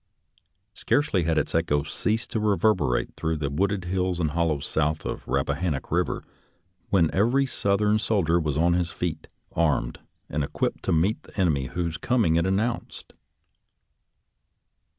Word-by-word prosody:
Scarcely 105 - +1
had 80 -1 +1
its - - 0
echoes 75 -2 0
ceased 110 +2 -1
to 110 - 0
reverberate 100 - +1
through 80 0 -1
the 70 -2 -2
wooded 95 +4 0
hills 90 0 -1
and 80 -3 0
hollows 80 -3 0
south 75 0 -1
of - - -4
the - - -9
Rappa 70 0 +1
hannock 80 -7 -2
Eiver - - 0 0.7
when 85 -5 +3
every 120 +8 +3
Southern 105 -3 +1
soldier 90 -6 +2
was 75 -3 -1
on 85 +2 +3
his 85 -1 0
feet, 85 -3 -4 0.2
armed 75 -7 0 0.3
and 75 +1 -2
equipped - - -2
to - - +1
meet 85 +7 +2
the - - -11
enemy 75 -8 +2
whose 85 +2 -2
coming 115 -10 +2
it 85 +2 +2
announced. 110 +5 -2
85 Hz, 150 wpm, -25 LUFS, 80-100 Hz, 0.7 s, when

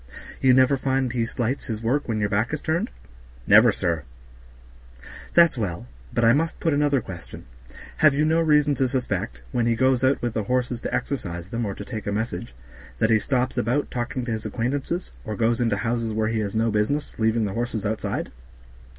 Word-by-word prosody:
"You 130 -1 +5
never 130 +2 +4
find 130 -2 0
he 115 -2 0
slights 125 +3 -2
his 110 -2 -5
work 135 +6 0
when 110 -2 -1
your 105 - +1
back 105 +3 0
is 155 - -9
turned?" 160 +1 0 0.6
"Never, 110 +3 +7
sir." 85 -6 -1 1.3
"That's 170 -7 +5
well; 90 - -3 0.3
but 120 - +1
I 115 - +6
must 165 +4 0
put 165 - +1
another 145 -2 +2
question. 90 -5 -10 0.5
Have 155 -3 +5
you 150 +2 +2
no 160 +1 +3
reason 150 -2 +4
to 130 -1 +1
suspect, 125 - -3
when 120 +7 +1
he 115 - +2
goes 130 +1 +2
out 130 +1 +3
with 120 -2 -2
the 110 -3 -2
horses 125 0 -1
to - - -4
exercise 85 -10 -3
them 115 0 -2
or 100 - -4
to 105 - -8
take 110 -3 -6
a - - 0
message, 100 - -3 0.4
that 110 0 +2
he 110 - +5
stops 130 +1 0
about 125 +5 0
talking 120 +1 -3
to 120 - -3
his 110 0 -3
acquaintances, 140 +9 -2
or 110 - -4
goes 115 +2 +1
into 115 -4 +1
houses 115 0 -1
where 110 0 0
he 115 -1 -1
has 105 0 -3
no 115 +1 +2
business, 110 +9 -1
leaving 110 0 +2
the 100 - -3
horses 115 -2 -3
outside?" 110 +1 -2
120 Hz, 200 wpm, -24 LUFS, 110-130 Hz, 1.3 s, Never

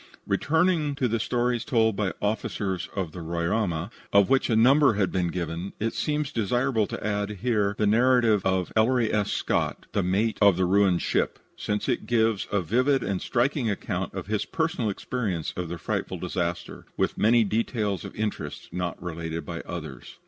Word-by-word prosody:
Returning 160 -2 +1
to 130 -2 +1
the 115 0 0
stories 120 +1 0
told 110 -3 +2
by 100 -2 0
officers 100 -3 -2
of 95 -5 -2
the 90 - -8
Roraima, 85 +2 -1 0.2
of 100 +2 +4
which 135 -1 +3
a 115 - +3
number 130 +2 +5
have 100 -3 +1
been 90 -2 0
given, 85 +1 -4
it 115 +2 -1
seems 150 -1 -1
desirable 120 -1 +1
to - - -6
add 105 -1 -1
here 105 -5 +1
the 105 - +1
narrative 115 -1 +4
of 95 -1 0
Ellery 115 +1 +3
S. 105 -2 +1
Scott, - - -1
the 100 - +1
mate 100 +5 0
of 100 -4 +6
the 95 - +2
ruined 95 -1 +3
ship, - - 0 0.2
since 105 0 -2
it - - -1
gives 115 -3 +1
a 100 - +2
vivid 130 - +2
and 100 -1 -2
striking 125 0 0
account 100 - -3
of - - -4
his 105 +1 -1
personal 160 - -1
experience 100 -6 -3
of 90 -2 -4
the 85 - -4
frightful - - -3
disaster, 85 -1 -4
with - - 0
many 115 +2 +5
details 105 -2 -1
of - - -8
interest 105 -1 -4
not 90 -1 -3
related 85 -1 -4
by 85 -1 -5
others. 80 -5 -7
105 Hz, 180 wpm, -26 LUFS, 95-120 Hz, 0.2 s, of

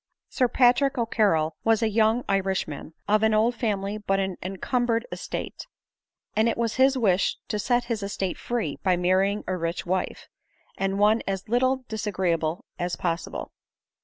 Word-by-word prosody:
Sir 255 - +2
Patrick 255 +3 +3
O'Carrol 205 -9 +1
was 225 0 +3
a - - +3
young 220 +2 +2
Irishman, 190 -6 -2
of 210 +1 +3
an 220 0 +3
old 225 +3 +3
family 210 -3 -2
but 195 -2 0
an 190 -1 -1
encumbered 230 +5 -1
estate; - - -5 0.7
and 220 +2 +3
it - - -2
was 230 -1 -1
his 265 +1 +4
wish 200 -6 +2
to. 210 - -1
set 240 +3 +1
his 230 -3 -3
estate 195 -2 -3
free 230 -12 -2
by 185 -2 +2
marrying 190 +3 +2
a 185 - -1
rich 170 0 -3
wife, 185 +1 -2 0.5
and 195 0 -1
one 210 +2 +4
as 195 -1 -3
little 255 +3 +1
disagreeably 180 -6 -1 0.2
as 175 0 -1
possible. 170 -1 -3
210 Hz, 160 wpm, -26 LUFS, 185-230 Hz, 0.7 s, his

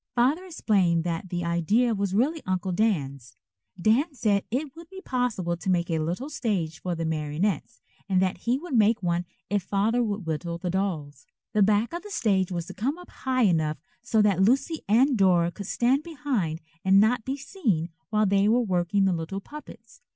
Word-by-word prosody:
Father 275 +10 +2
explained 195 - +1
that 170 +2 -3
the 175 -1 -3
idea 200 +9 +2
was 200 -2 -1
really 295 +8 +1
Uncle 185 0 -1
Dan's. 145 - -1 0.4
Dan 260 - +2
said 205 -5 +1
it 270 +4 -3
would 335 0 -12
be 385 - -9
possible 245 - -1
to 175 - -5
make 175 -1 +1
a 160 - +1
little 175 - -2
stage 195 - -2
for 180 -1 -2
the 165 0 -3
marionettes 160 +6 -2 0.3
and 185 -1 +3
that 185 0 +1
he 240 +2 0
would 330 0 -8
make 225 -1 +3
one 175 0 0 0.3
if 205 -1 +2
Father 205 +6 +1
would 205 -4 -2
whittle 165 +2 -3
the 175 +1 -3
dolls. 170 -7 -3 0.3
The 215 - +3
back 210 +6 +3
of 345 - -4
the 415 - -11
stage 195 - +1
was 170 -2 -3
to - - -9
come 255 - -2
up 355 - -13
high 255 -1 0
enough 160 -6 +2 0.2
so 225 -3 +2
that 195 -3 +2
Lucy 270 - +2
and 255 +6 +4
Dora 180 -4 +3
could 200 +1 -8
stand 255 +6 +2
behind 270 - -2 0.2
and 190 +1 +5
not 220 +3 +3
be 265 +4 -3
seen 230 - -1 0.2
while 215 0 +2
they 200 0 +3
were 235 +3 +4
working 185 0 +1
the 190 - +2
little 170 +4 -4
puppets. 300 - -12
200 Hz, 195 wpm, -26 LUFS, 175-245 Hz, 0.4 s, and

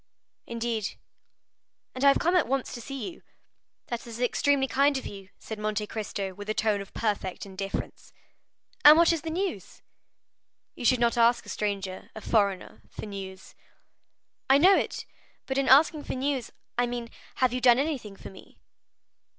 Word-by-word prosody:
"Indeed?" 230 -2 -3 1.0
"And 255 - -4
I - - +6
have 275 - +6
come 345 +2 +1
at 355 - +3
once 270 +1 -1
to 240 - -7
see 275 +8 -5
you." 335 - -17 0.7
"That 240 0 -4
is 230 0 -8
extremely 270 +2 +2
kind 280 +1 +2
of 265 - -6
you," 195 -1 -9
said 220 -1 -8
Monte 215 0 -1
Cristo 205 -3 -4
with 205 +2 -9
a 215 - 0
tone 210 -2 +1
of 195 - -10
perfect 205 -5 -2
indifference. 195 0 -6 0.7
"And 300 +1 +10
what 335 0 +5
is 330 - -2
the 325 - -5
news?" 370 +4 -4 0.9
"You - - -7
should 255 0 +4
not 235 0 +2
ask 235 0 +4
a - - -11
stranger, 195 -2 -3
a 220 - -7
foreigner, 200 -4 0
for - - -8
news." 190 -2 -8 1.0
"I 270 - +7
know 370 +7 +6
it, - - -2 0.4
but 265 0 -1
in 275 - +1
asking 295 +2 +5
for - - -4
news, 265 -2 -1 0.3
I 245 - +3
mean, 240 -1 -5 0.2
have 255 -2 +2
you 250 - -2
done 245 -1 +6
anything 270 -8 -2
for - - -10
me?" 190 - -16
235 Hz, 175 wpm, -27 LUFS, 210-275 Hz, 1.0 s, And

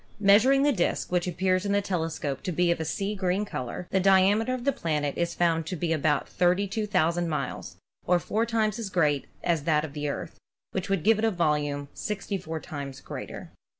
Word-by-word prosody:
Measuring 225 +7 +5
the 290 - +4
disc, 180 -7 -1
which 180 0 +1
appears 185 +1 +1
in 200 -1 0
the 200 - +4
telescope 165 -8 -2
to 185 - -3
be 175 +1 +2
of 170 - 0
a 160 - -2
sea 195 +5 -2
green 190 +1 0
color, 150 0 -5
the 190 - +3
diameter 195 +5 +4
of 255 -1 -3
the 280 - +3
planet 150 - -2
is 170 0 -1
found 165 -2 +2
to 185 - -3
be 165 0 -1
about 150 -2 +1
32,000 180 -2 +1
miles, 150 - -4 0.3
or 180 - +5
four 215 +6 -1
times 220 -2 0
as 220 -4 -4
great 150 -6 +1 0.2
as 165 -4 0
that 155 -1 +2
of 145 - -9
the 150 0 -2
Earth, - - -6 0.3
which 190 +1 -3
would 195 -5 0
give 220 +2 +4
it 225 - +1
a - - +4
volume 150 -6 0
64 195 -5 -4
times 140 -4 -7
greater. - - -8
180 Hz, 200 wpm, -27 LUFS, 160-200 Hz, 0.3 s, Measuring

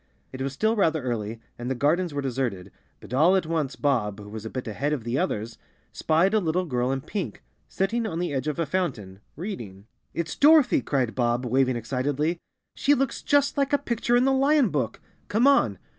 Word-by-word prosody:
It 130 - -6
was 135 +1 -1
still 220 - +1
rather 160 - +1
early 115 -3 -3 0.2
and 120 +1 -4
the 130 - -1
gardens 160 +7 +1
were 145 -1 -3
deserted, 120 -8 -3 0.3
but - - -10
all 160 +8 +5
at 185 -3 +1
once 155 -4 -2
Bob, 110 -8 0
who 105 0 -10
was 110 +1 -7
a - - -6
bit 130 0 -5
ahead 140 +7 -1
of 135 -6 -3
the 120 +4 -1
others, 110 +2 -3 0.3
spied 165 +6 +2
a 215 - +4
little 180 0 0
girl 125 -4 -1
in 135 0 -2
pink, 195 +6 -5 0.3
sitting 225 +4 -1
on 165 - -4
the 175 -3 -2
edge 135 +2 -2
of 150 - -2
a 165 - 0
fountain, 125 - -3 0.2
reading. 115 - -7 0.3
"It's 170 -1 -3
Dorothy!" 295 -3 +5
cried 130 -5 -1
Bob, 120 0 0
waving 130 +1 +2
excitedly. 140 +7 -1 0.3
"She 290 - +3
looks 275 -1 -1
just 285 -1 +2
like 280 +1 +1
a - - +6
picture 240 -3 0
in 245 +1 +4
the 270 - +3
lion 275 -2 +3
book! 130 -8 -2 0.3
Come 225 +5 +2
on!" 200 - +4
145 Hz, 205 wpm, -25 LUFS, 120-195 Hz, 0.3 s, a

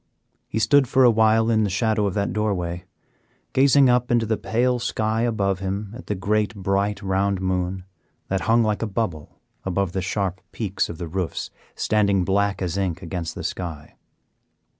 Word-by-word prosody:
He - - -4
stood 130 +5 +4
for 130 +2 +4
a 120 - +7
while 110 +1 +3
in 110 -1 +3
the 105 - 0
shadow 105 +2 +1
of 95 - -3
the 100 -1 +1
doorway, 90 -5 -2 0.7
gazing 135 +1 +5
up 125 0 +2
into 120 -1 +2
the 110 0 +1
pale 125 +3 0
sky 110 -2 -1
above 100 -5 0
him 100 +2 -4
at 125 - -11
the 105 - -1
great, 105 +3 0
bright, 100 +1 -1
round 95 0 0
moon, 95 0 -1 0.4
that 95 0 -1
hung 115 +1 +5
like 105 -1 0
a 115 - -1
bubble 95 -7 -3 0.3
above 95 0 -1
the 95 - -2
sharp 95 0 -2
peaks 100 -4 -2
of 85 - -6
the 85 - -5
roofs 90 +1 -3 0.2
standing 100 -3 +2
black 100 0 +1
as 90 +2 -2
ink 90 -2 -2
against 85 -2 -4
the - - -6
sky. 80 -5 -5
100 Hz, 180 wpm, -23 LUFS, 95-110 Hz, 0.7 s, a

